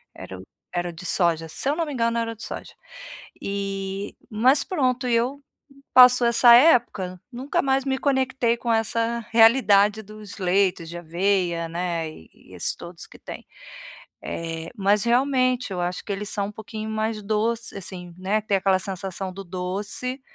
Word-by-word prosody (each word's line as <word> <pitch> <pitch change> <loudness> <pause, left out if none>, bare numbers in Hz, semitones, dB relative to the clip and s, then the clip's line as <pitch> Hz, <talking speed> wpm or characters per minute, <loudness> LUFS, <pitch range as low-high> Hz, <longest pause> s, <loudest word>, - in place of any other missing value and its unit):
era 95 - -9
o - - -11 0.3
era 175 0 -1
o - - -6
de 175 +2 -11
soja, 170 -3 +1
se 215 - -3
eu 290 - +1
não 335 0 -1
me 295 - -6
engano 230 -2 0
era 230 0 -1
o - - -8
de 220 - -17
soja. - - -7 0.7
E 195 0 -4
mas 255 +6 +3
pronto 255 -7 -1
e 245 - +1
eu 260 +5 -1 0.5
passou 250 -1 +8
essa 235 0 +7
época, 240 - +3
nunca 255 +4 -2
mais 270 -1 +1
me 265 -1 -1
conectei 265 -4 +1
com 235 0 -4
essa 230 +1 0
realidade 220 -3 +5
dos 215 0 -11
leitos 185 -2 +1
de 170 +1 -7
aveia, 175 0 -1
né, 170 -1 -3
e 80 - -17
esses - - -2
todos 170 0 -10
que - - -16
têm. - - -10 0.8
Eh, 165 0 -5
mas 205 0 +2
realmente 255 -1 +1
eu 180 - -3
acho 175 +1 -3
que 205 - -4
eles 200 +1 -4
são 200 -1 -2
um - - -9
pouquinho 215 0 -7
mais 220 0 -2
doce 220 +3 -2
assim, 180 -2 -9
né, 195 +4 0
tem 205 -1 +1
aquela 190 0 +2
sensação 190 0 -4
do 195 +2 -8
doce, 195 +8 -4
210 Hz, 175 wpm, -24 LUFS, 185-240 Hz, 0.8 s, passou